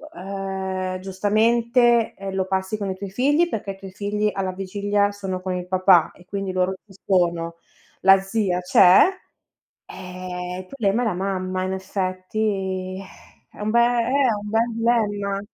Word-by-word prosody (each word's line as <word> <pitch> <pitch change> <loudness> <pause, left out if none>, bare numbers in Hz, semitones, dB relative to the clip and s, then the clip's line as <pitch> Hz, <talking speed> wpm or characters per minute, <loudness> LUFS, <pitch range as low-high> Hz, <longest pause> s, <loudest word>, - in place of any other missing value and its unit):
ehm, 190 0 -4
giustamente, 230 +5 +2
eh, 195 0 -6
lo 190 -1 0
passi 190 +2 -2
con 200 -2 -3
i 190 - -3
tuoi 200 -1 -6
figli, 290 - +2
perché 205 -9 -4
i 195 - -10
tuoi 195 -1 -10
figli 210 +2 -1
alla 190 -1 -2
vigilia 200 +2 0
sono 190 -2 -5
con 185 0 -3
il 180 0 -5
papà 185 -2 +4
e 180 - -19
quindi 195 -1 -4
loro 185 +1 0
ci 195 - -18
sono, 170 -3 +1 0.5
la 195 0 +7
zia 195 -2 -1
c'è, 180 +1 +6 0.9
eh, 180 0 -7
il 185 - -8
problema 225 -2 0
è - - -1
la 210 - 0
mamma 185 0 -2
in 185 0 -2
effetti, 190 0 -3
eh. 190 - -15 0.2
È - - -17
un 215 +1 -1
be 235 - +4
eh, - - +6
è 245 +1 +2
un - - -7
bel 225 +1 +1 0.3
dilemma. 200 -1 -3
195 Hz, 170 wpm, -23 LUFS, 185-210 Hz, 0.9 s, la